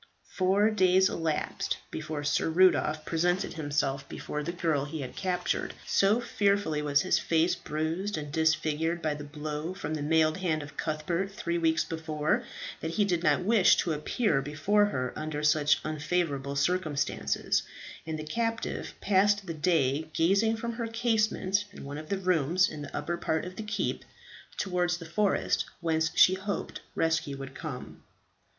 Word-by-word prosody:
Four 195 +3 +3
days 190 -2 +4
elapsed 160 -2 -2
before 155 -1 -4
Sir 145 +2 +1
Rudolph 160 -3 +3
presented 175 +3 0
himself 145 -3 -1
before 150 - -4
the 170 - -3
girl 160 -5 0
he 150 +1 -5
had 125 -2 -7
captured. 180 -2 -1
So 200 +4 +3
fearfully 200 -9 +1
was 145 -1 +2
his - - +2
face 165 +1 +2
bruised 165 +7 -2
and 150 -1 -5
disfigured 160 +1 +1
by 155 -1 +1
the 145 0 -7
blow 150 +3 -5
from 185 -5 -4
the 155 - -3
mailed 155 +1 +3
hand 160 -5 -1
of 145 0 -11
Cuthbert 170 +5 -2
three 170 -5 -2
weeks 160 -1 +2
before, 155 -2 -1 0.4
that 160 +1 -4
he 205 - +4
did 175 -4 0
not 175 - +2
wish 210 -1 +5
to 165 - 0
appear 150 - 0
before 155 +9 +2
her 130 -10 -2
under 155 -1 -4
such 150 -1 +4
unfavourable 150 -3 -1
circumstances, 155 0 0 0.4
and 160 -1 -4
the 155 - -5
captive 230 +8 -3
passed 205 +1 +3
the 170 - -4
day 155 -3 +1
gazing 200 +8 +3
from 235 +1 -3
her 230 0 -3
casement 220 -4 +1
in - - -10
one 145 +2 -6
of 155 - -10
the 200 - 0
rooms 180 0 +2
in 150 - -7
the 145 - -6
upper 160 +4 -2
part 160 -1 -1
of 180 0 -8
the - - -5
keep, 215 0 -2 0.5
towards 180 -2 0
the 170 - -9
forest 200 +5 +1
whence 160 -2 +1
she 185 - +7
hoped 190 +2 -4
rescue 160 -3 0
would 135 -1 -8
come. 140 -4 -7
165 Hz, 165 wpm, -29 LUFS, 150-190 Hz, 0.5 s, she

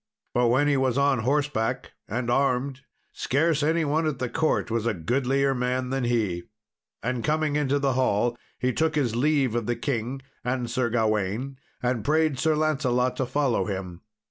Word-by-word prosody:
But 120 0 +3
when 130 +5 +3
he 145 -1 +3
was 130 -1 +1
on 140 -2 +3
horseback 135 -2 0 0.2
and 120 +2 -2
armed, 135 +1 +1 0.3
scarce 155 +2 +1
any 160 +2 +2
one 155 +2 +1
at 150 -4 -1
the 125 -1 -2
court 155 -3 0
was 115 0 0
a 115 - 0
goodlier 135 - +1
man 125 0 -1
than 135 -2 0
he. 110 -8 0 0.6
And 125 0 -2
coming 155 -1 +1
into 145 -1 +1
the 140 -2 +1
hall, 120 -2 +1 0.2
he 125 0 0
took 160 +3 +1
his 125 -7 +1
leave 140 -1 +2
of 120 -2 -1
the 120 - +1
king 130 0 -3 0.2
and 125 -1 -2
Sir 125 -2 0
Gawain, 110 +3 -1 0.2
and 125 -3 0
prayed 155 0 +2
Sir 160 +2 +2
Lancelot 130 -5 +1
to 130 - -1
follow 130 -8 +1
him. 95 -3 -5
130 Hz, 175 wpm, -26 LUFS, 120-145 Hz, 0.6 s, But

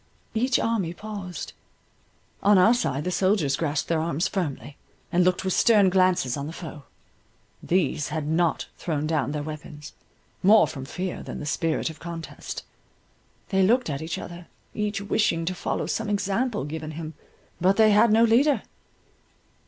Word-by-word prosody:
Each 240 +2 +2
army 200 -7 -1
paused. 200 -6 -7 0.9
On 205 0 +5
our 185 +6 +6
side 145 - -1
the 180 - -2
soldiers 180 -6 +2
grasped 155 -1 -1
their 165 -2 +1
arms 165 0 0
firmly, 150 -6 -4 0.4
and 180 0 +3
looked 185 +1 +2
with 190 - +1
stern 205 -5 +5
glances 185 -8 +2
on 140 0 -4
the 160 - -7
foe. 160 -4 -9 0.8
These 160 -5 0
had 155 0 -3
not 160 +2 +1
thrown 155 -3 -2
down 150 -4 0
their 150 -1 -3
weapons, 150 -1 -8 0.5
more 210 +3 +6
from 135 -2 -7
fear 180 +5 -4
than - - -7
the - - -6
spirit 160 +2 -1
of 160 - -15
contest; 165 -1 -7 0.9
they 195 -2 +2
looked 235 +2 +3
at 140 +1 -4
each 160 +1 -4
other, 175 0 -8 0.3
each 210 -1 -2
wishing 200 -5 +1
to 185 - -1
follow - - -2
some 225 -1 -2
example 205 - 0
given 155 +1 -5
him,—but 165 +3 -3
they 220 -1 +6
had 210 +2 +5
no 225 +2 +5
leader. 260 +6 +4
175 Hz, 160 wpm, -25 LUFS, 155-205 Hz, 0.9 s, our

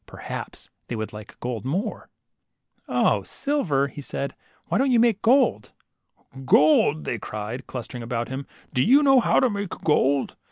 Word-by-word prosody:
Perhaps - - -8 0.2
they 120 - -4
would 110 -1 -5
like 105 -1 -11
gold 120 -4 -4
more! 190 - -3 0.8
0, - - +2
silver! 150 - -1
" 145 - -6
said 140 0 -4
he. - - -33 0.3
Why - - 0
don't 270 +1 +2
you 245 -2 +4
make 225 -3 +3
gold?" 260 +4 +2 0.7
Gold," 150 +2 +4
they 115 - -3
cried, 110 +4 -6
clustering 125 -1 -7
about 115 0 -3
him, 130 +2 -6 0.3
do 125 - +2
you 275 +7 +5
know 270 -2 +6
how - - +3
to 255 - +3
make 205 -4 -3
gold?" 140 -4 +1
140 Hz, 165 wpm, -24 LUFS, -, 0.8 s, know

